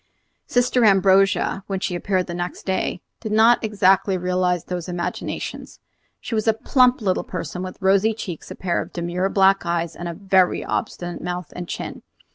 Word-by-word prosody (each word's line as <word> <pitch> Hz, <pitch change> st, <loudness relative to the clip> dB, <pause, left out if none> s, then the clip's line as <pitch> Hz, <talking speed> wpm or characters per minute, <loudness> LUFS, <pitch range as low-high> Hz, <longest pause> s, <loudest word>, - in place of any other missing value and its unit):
Sister 245 Hz, 0 st, +2 dB
Ambrogia, 195 Hz, -1 st, +3 dB
when 195 Hz, -1 st, -2 dB
she 185 Hz, -, -2 dB
appeared 185 Hz, +1 st, -1 dB
next 175 Hz, 0 st, -5 dB
day, 190 Hz, -1 st, -2 dB, 0.2 s
did 220 Hz, -, -5 dB
not 225 Hz, +3 st, +5 dB
exactly 195 Hz, -2 st, +3 dB
realize 180 Hz, -1 st, 0 dB
these 180 Hz, -1 st, -5 dB
imaginations. 175 Hz, -1 st, -5 dB, 0.4 s
She -, -, -7 dB
was 215 Hz, 0 st, 0 dB
a 225 Hz, -, +5 dB
plump 250 Hz, +2 st, +3 dB
little 190 Hz, -3 st, 0 dB
person, 180 Hz, 0 st, -5 dB
with 185 Hz, 0 st, -6 dB
rosy 200 Hz, +3 st, +3 dB
cheeks, 180 Hz, -7 st, -7 dB
a -, -, -7 dB
pair 175 Hz, -2 st, -1 dB
of -, -, -9 dB
demure 175 Hz, +2 st, -1 dB
black 195 Hz, 0 st, +4 dB
eyes, 170 Hz, -1 st, -2 dB
and 175 Hz, -, -6 dB
a 170 Hz, -, -5 dB
very 190 Hz, -1 st, +2 dB
obstinate 175 Hz, 0 st, -3 dB
mouth 180 Hz, -2 st, -5 dB
and 175 Hz, -1 st, -6 dB
chin. -, -, -6 dB
185 Hz, 170 wpm, -22 LUFS, 175-200 Hz, 0.4 s, not